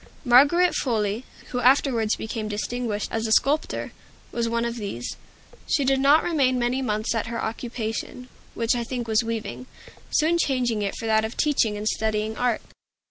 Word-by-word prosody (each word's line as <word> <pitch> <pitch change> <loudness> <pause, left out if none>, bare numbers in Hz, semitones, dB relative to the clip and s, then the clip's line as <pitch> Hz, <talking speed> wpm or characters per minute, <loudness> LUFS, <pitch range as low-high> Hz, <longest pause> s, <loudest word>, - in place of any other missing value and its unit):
Margaret 290 +9 +5
Foley, 220 -1 -1 0.2
who 250 - -2
afterwards 250 -3 +3
became 220 -1 -4
distinguished 215 0 -3
as 225 0 -1
a - - -3
sculptor, 285 +7 +1 0.4
was 230 -1 -1
one 235 0 0
of 235 0 -3
these. 200 - -5 0.5
She 285 -3 +2
did 270 0 +3
not 285 +3 +5
remain 275 -7 +2
many 245 +2 0
months 215 -3 -1
at 225 -1 -2
her 230 0 -4
occupation, 230 +2 -4 0.3
which 230 0 +1
I 240 -1 -1
think 240 0 -4
was 220 +1 +2
weaving, 230 +2 -5 0.4
soon 335 +2 +2
changing 245 -7 +1
it 200 -1 -2
for - - -6
that 220 0 +3
of 220 +1 -5
teaching 235 -8 +2
and 210 +1 -3
studying 220 0 -1
art. 245 -2 0
235 Hz, 170 wpm, -24 LUFS, 220-255 Hz, 0.5 s, Margaret